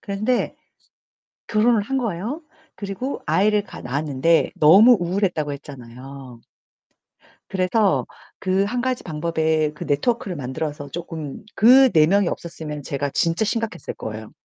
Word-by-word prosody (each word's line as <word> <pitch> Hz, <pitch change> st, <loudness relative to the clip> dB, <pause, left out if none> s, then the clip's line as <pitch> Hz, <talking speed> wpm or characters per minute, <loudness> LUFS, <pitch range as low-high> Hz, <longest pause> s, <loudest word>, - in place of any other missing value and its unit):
그런데 215 Hz, +5 st, -1 dB, 0.9 s
결혼을 225 Hz, 0 st, +3 dB
한 270 Hz, +5 st, -2 dB
거예요. 230 Hz, -, -3 dB, 0.3 s
그리고 200 Hz, +7 st, -5 dB
아이를 205 Hz, +6 st, +2 dB
가 -, -, -11 dB
낳았는데 145 Hz, +4 st, +1 dB
너무 205 Hz, +11 st, +7 dB
우울했다고 175 Hz, -4 st, -1 dB
했잖아요. 130 Hz, -2 st, -11 dB, 1.1 s
그래서 195 Hz, +2 st, +1 dB, 0.3 s
그 190 Hz, +1 st, +1 dB
한 245 Hz, +4 st, -2 dB
가지 255 Hz, 0 st, -2 dB
방법에 160 Hz, -1 st, 0 dB
그 -, -, -7 dB
네트워크를 185 Hz, -, -1 dB
만들어서 145 Hz, +2 st, -5 dB
쪼끔 160 Hz, -4 st, -7 dB
그 255 Hz, +4 st, +7 dB
네 155 Hz, -1 st, +5 dB
명이 195 Hz, +1 st, +3 dB
없었으면 155 Hz, -3 st, -6 dB
제가 140 Hz, +1 st, -3 dB
진짜 165 Hz, +8 st, +1 dB
심각했을 225 Hz, -5 st, -3 dB
거예요. 110 Hz, 0 st, -7 dB
170 Hz, 305 characters per minute, -22 LUFS, 150-215 Hz, 1.1 s, 너무